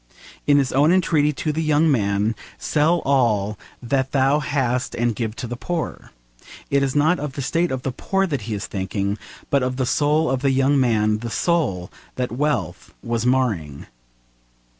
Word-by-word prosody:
In 145 -1 +5
his 135 -2 +1
own 145 +5 +4
entreaty 160 -5 +3
to 155 - -2
the 155 +2 -2
young 155 0 +3
man, 105 -2 +1 0.2
'Sell 160 +3 +1
all 110 -7 +2 0.3
that 130 +2 -1
thou 135 +2 +3
hast 130 -4 -1
and 120 -1 0
give 110 -1 -3
to 130 - -5
the 120 +1 -5
poor,' 165 +6 -4 0.6
it 140 0 +3
is 135 0 -1
not 155 +5 +3
of 145 -2 -4
the 140 - -4
state 170 +6 +1
of 130 -1 -3
the 135 - -1
poor 195 +9 0
that 145 -9 -2
he 110 - -1
is 100 - -4
thinking 100 +1 -3 0.3
but 140 - +3
of 125 0 -1
the 130 0 0
soul 150 +4 +2
of 130 -1 -1
the 140 - +2
young 135 +1 +3
man, 110 -4 +2
the 115 +1 -5
soul 120 - 0 0.2
that 125 -3 -2
wealth 120 - -2
was 115 0 -1
marring. 105 - 0
130 Hz, 180 wpm, -22 LUFS, 115-150 Hz, 0.6 s, In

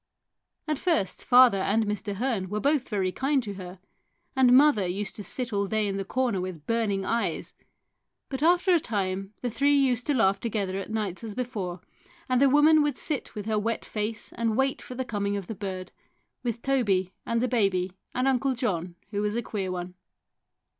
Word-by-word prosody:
At 305 -3 -1
first 265 - 0
father 245 -5 +6
and 215 +3 +1
Mr. 210 0 -3
Hearn 215 -4 -1
were 210 +2 -2
both 285 +1 +1
very 195 -4 0
kind 270 +4 +1
to 205 -3 -5
her, 185 -1 -8 0.6
and 260 -2 +5
mother 270 -10 +5
used 195 +3 -3
to 205 - -6
sit 240 +4 -4
all 200 0 +1
day 215 0 0
in 195 0 -2
the 195 - -2
corner 240 -2 0
with 180 -5 -6
burning 215 -4 0
eyes, 230 +3 -1 0.7
but 265 -1 -5
after 350 +3 +4
a 345 - +5
time 195 -4 -3
the 245 - -1
three 280 +5 +3
used 250 -3 +1
to 290 - +2
laugh 195 -4 +3
together 200 -4 -2
at 195 - -6
nights 215 -3 -3
as 215 -3 -5
before, 205 -8 -4 0.5
and 255 -1 +2
the 280 - +6
woman 300 +3 +6
would 295 -3 0
sit 295 -6 -3
with 210 -1 -5
her 215 -1 +1
wet 225 +2 -2
face 215 +1 -4
and 230 -1 -1
wait 270 0 +1
for 250 - -9
the 260 +1 -3
coming 205 -3 -1
of 195 - -5
the 220 - -5
bird, 190 -3 -6 0.5
with 235 -1 -3
Toby 200 -9 +1
and 230 0 0
the 250 - +1
baby 195 -6 +1 0.2
and 255 +1 +1
Uncle 265 0 +2
John, 180 -8 -2 0.2
who 205 -1 -1
was 210 +1 -1
a 235 - -1
queer 195 -4 -3
one. 180 0 -5
220 Hz, 200 wpm, -27 LUFS, 195-255 Hz, 0.7 s, father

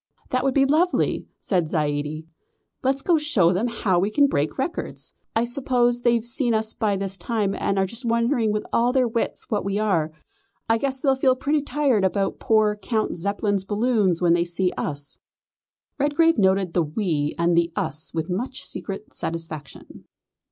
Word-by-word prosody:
"That 255 - +1
would 270 -1 +1
be 275 - +5
just 270 - +1
too 295 - +4
lovely!" 355 +2 +1
said 175 -6 0
Zaidie. 150 0 -2 0.6
"Let's 270 +1 0
go 350 - +2
and - - -2
show 200 - +3
them 205 +7 0
how 205 -6 +1
we 195 +3 +1
can 285 +6 +4
break 150 - 0
records. 275 +6 -4 0.2
I 225 - +3
suppose 245 -1 +1
they've 235 -1 +2
seen 240 -1 0
us 220 0 -1
by 210 -3 0
this 195 0 -2
time 205 +1 -1
and 200 - -1
are 190 - +3
just 230 +6 -7
wondering 235 -1 +1
with 210 0 -2
all 240 +1 +3
their 255 -1 +2
wits 230 +1 -3
what 210 - 0
we 200 0 -1
are. 180 -8 +1 0.6
I 225 0 +2
guess 265 0 -2
they'll 270 -2 +3
feel 260 -1 +3
pretty 290 +3 0
tired 275 -6 +1
about 195 +1 0
poor 215 -1 +3
Count 215 +1 -2
Zeppelin's 200 +2 -1
balloon 210 -1 +1
when 170 -1 +3
they 170 0 +3
see 175 +1 -1
us." 145 -1 -4 0.8
Redgrave 295 +1 +3
noted 190 -2 +2
the 175 - +3
"we" 155 -2 -1
and 170 0 +2
the 170 0 +2
"us" 155 +3 -3
with 160 -1 -3
much 235 +9 -3
secret 200 +1 -6
satisfaction. 160 -3 -7
210 Hz, 185 wpm, -23 LUFS, 180-250 Hz, 0.8 s, be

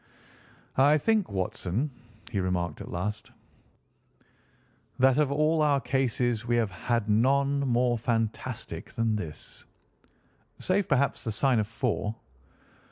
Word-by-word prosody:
"I 145 +3 +6
think, 215 +6 +1
Watson," 95 - -2 0.4
he 100 - -1
remarked 90 -4 -1
at - - -8
last, 105 +5 -4 1.7
"that 130 +2 +4
of 145 -2 +2
all 155 +2 +2
our 145 -2 +3
cases 125 -3 0
we 120 0 0
have 115 -4 +1
had 115 +4 -1
none 135 +6 +3
more 125 -3 +1
fantastic 115 -1 -3
than 115 -1 0
this." 85 -8 -7 0.9
"Save, 190 +1 0
perhaps, 140 -1 +1
the 115 - -2
Sign 125 +2 +2
of 105 - 0
Four." 115 -2 -2
120 Hz, 120 wpm, -28 LUFS, 105-140 Hz, 1.7 s, I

